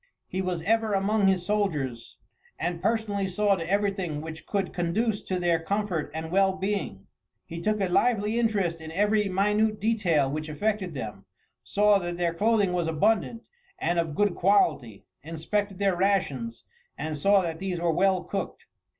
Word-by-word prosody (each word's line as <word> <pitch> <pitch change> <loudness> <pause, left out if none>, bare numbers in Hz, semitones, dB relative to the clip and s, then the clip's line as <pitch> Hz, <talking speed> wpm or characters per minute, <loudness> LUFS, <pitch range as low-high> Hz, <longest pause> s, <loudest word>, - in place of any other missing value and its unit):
He 190 - -3
was 180 -3 -2
ever 220 +2 +1
among 200 +1 +2
his 185 -2 +2
soldiers, 150 - -2 0.4
and 170 +1 -3
personally 210 -2 0
saw 200 +2 +2
to 170 -3 -3
everything 195 -6 0
which 160 +1 -8
could 195 -2 -2
conduce 200 +5 0
to 185 -1 -3
their 170 -2 +2
comfort 185 -3 -2
and 160 +1 -5
well 190 0 +3
being. 190 - -3 0.4
He 170 0 -7
took 215 +3 0
a 195 - +1
lively 220 +3 +2
interest 195 -8 0
in 160 0 -8
every 210 +3 +2
minute 210 +3 +1
detail 190 -10 +2
which 155 +1 -4
affected 190 +1 -2
them; 105 -6 -6 0.4
saw 205 0 +3
that 175 -1 -4
their 170 -1 0
clothing 205 0 +2
was 175 -2 0
abundant 215 +7 +1 0.3
and 170 0 0
of 160 -3 -2
good 205 -2 +2
quality, 150 - +1 0.2
inspected 180 +6 -3
their 195 -2 +1
rations, 200 +5 -1 0.3
and 155 0 -3
saw 195 +7 +4
that 165 -2 -4
these 185 -2 -3
were 170 -1 +1
well 185 +2 +2
cooked. 195 - -5
190 Hz, 165 wpm, -27 LUFS, 165-205 Hz, 0.4 s, saw